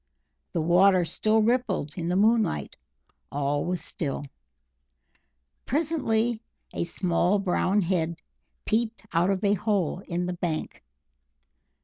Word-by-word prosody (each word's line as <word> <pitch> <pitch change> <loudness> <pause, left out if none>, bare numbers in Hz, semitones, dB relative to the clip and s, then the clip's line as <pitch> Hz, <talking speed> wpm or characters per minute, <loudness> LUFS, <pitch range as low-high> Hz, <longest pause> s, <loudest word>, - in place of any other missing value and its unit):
The 170 - 0
water 180 +2 +5
still 215 +5 +1
rippled 225 - 0
in 170 -1 -3
the 180 - +1
moonlight; 210 - +2 0.6
all 145 +1 0
was 180 0 -2
still. 145 -2 -4 1.4
Presently 240 -7 0 0.3
a - - -1
small 175 +2 +1
brown 195 +1 +1
head 170 -2 0 0.5
peeped 225 0 -1
out 170 +3 +3
of 195 0 0
a 200 0 +4
hole 200 -4 0
in 175 0 -1
the 180 - -2
bank. 170 -3 -4
185 Hz, 115 wpm, -26 LUFS, 170-220 Hz, 1.4 s, water